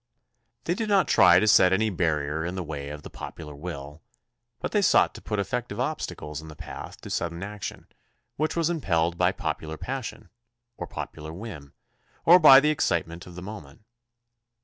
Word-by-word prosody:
They 170 Hz, -, 0 dB
did 220 Hz, +3 st, -3 dB
not 195 Hz, -2 st, +4 dB
try -, -, +6 dB
to 110 Hz, -, +1 dB
set 95 Hz, -3 st, +6 dB
any 110 Hz, +3 st, +2 dB
barrier 80 Hz, -3 st, 0 dB
in 90 Hz, +2 st, -3 dB
the 95 Hz, -, -3 dB
way 75 Hz, -3 st, -6 dB
of 75 Hz, 0 st, -8 dB
the -, -, -8 dB
popular 75 Hz, -3 st, -8 dB
will, 75 Hz, -1 st, -8 dB, 0.6 s
but -, -, -4 dB
they -, -, +2 dB
sought -, -, +4 dB
to -, -, -11 dB
put 105 Hz, -, -3 dB
effective 100 Hz, +2 st, -3 dB
obstacles 125 Hz, -, -4 dB
in 80 Hz, -, -11 dB
the 75 Hz, -, -10 dB
path -, -, -9 dB
to -, -, -9 dB
sudden 85 Hz, +1 st, -2 dB
action 105 Hz, -1 st, -7 dB, 0.5 s
which 155 Hz, +2 st, -1 dB
was 170 Hz, 0 st, +1 dB
impelled 85 Hz, -, 0 dB
by -, -, +4 dB
popular 80 Hz, 0 st, -4 dB
passion, 130 Hz, +3 st, -6 dB, 0.4 s
or -, -, -6 dB
popular 80 Hz, 0 st, -7 dB
whim, 85 Hz, -6 st, -9 dB, 0.5 s
or 175 Hz, +2 st, +8 dB
by 135 Hz, -5 st, +10 dB
the 150 Hz, +2 st, +2 dB
excitement 85 Hz, -, -1 dB
of 90 Hz, -, -11 dB
the 90 Hz, -, -8 dB
moment. 100 Hz, -5 st, -10 dB
90 Hz, 180 wpm, -26 LUFS, 80-120 Hz, 0.6 s, by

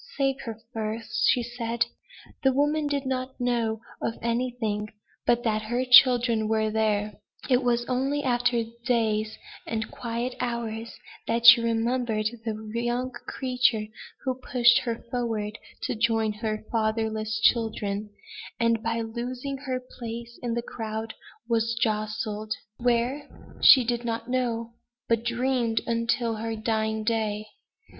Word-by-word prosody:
"Save 270 Hz, -1 st, +1 dB
her 225 Hz, -2 st, -6 dB
first!" 220 Hz, +1 st, -1 dB, 0.3 s
said 235 Hz, -1 st, 0 dB
she. -, -, -10 dB, 0.5 s
The 265 Hz, -, +4 dB
woman 295 Hz, +3 st, +1 dB
did 285 Hz, -1 st, -1 dB
not 260 Hz, 0 st, -3 dB
know 235 Hz, -3 st, 0 dB, 0.2 s
of 225 Hz, -, -2 dB
anything, 235 Hz, -3 st, -1 dB, 0.4 s
but 240 Hz, 0 st, +3 dB
that 215 Hz, -3 st, +1 dB
her 240 Hz, +4 st, -1 dB
children 245 Hz, -3 st, +6 dB
were 220 Hz, 0 st, +1 dB
there; 210 Hz, -1 st, 0 dB, 0.3 s
it 250 Hz, +1 st, +4 dB
was 240 Hz, -1 st, +1 dB
only 270 Hz, +4 st, 0 dB
in -, -, -7 dB
after 245 Hz, -1 st, +2 dB, 0.2 s
days, 220 Hz, -3 st, +1 dB, 0.3 s
and 225 Hz, 0 st, -3 dB
quiet 240 Hz, +1 st, -3 dB
hours, 230 Hz, -2 st, -3 dB, 0.3 s
that 230 Hz, +1 st, 0 dB
she 235 Hz, 0 st, +11 dB
remembered 230 Hz, -1 st, 0 dB
the 215 Hz, -1 st, -5 dB
young 245 Hz, +2 st, -1 dB
creature 250 Hz, -5 st, 0 dB, 0.4 s
who 260 Hz, -, 0 dB
pushed 245 Hz, -1 st, +4 dB
her 235 Hz, -2 st, -2 dB, 0.2 s
forward 225 Hz, -3 st, -2 dB, 0.2 s
to -, -, -1 dB
join 225 Hz, -1 st, +1 dB
her 215 Hz, 0 st, -3 dB
fatherless 220 Hz, -1 st, 0 dB
children, 215 Hz, -3 st, +1 dB, 0.5 s
and, 230 Hz, -1 st, +2 dB
by 230 Hz, 0 st, -1 dB
losing 245 Hz, +4 st, -4 dB
her 255 Hz, -1 st, 0 dB
place 235 Hz, -1 st, -8 dB
in 235 Hz, -1 st, -2 dB
the 235 Hz, -, -1 dB
crowd, 220 Hz, -1 st, -5 dB, 0.3 s
was 230 Hz, 0 st, +1 dB
jostled 215 Hz, 0 st, -1 dB, 0.2 s
where, 245 Hz, +4 st, 0 dB, 0.3 s
she 260 Hz, -, +9 dB
did 240 Hz, 0 st, -1 dB
not 230 Hz, 0 st, -3 dB
know 235 Hz, -2 st, -1 dB, 0.3 s
but 230 Hz, -1 st, +2 dB
dreamed 240 Hz, -1 st, +1 dB
until 230 Hz, 0 st, 0 dB
her 225 Hz, +1 st, -3 dB
dying 220 Hz, 0 st, -1 dB
day. 215 Hz, -1 st, -1 dB
230 Hz, 135 wpm, -26 LUFS, 220-245 Hz, 0.5 s, she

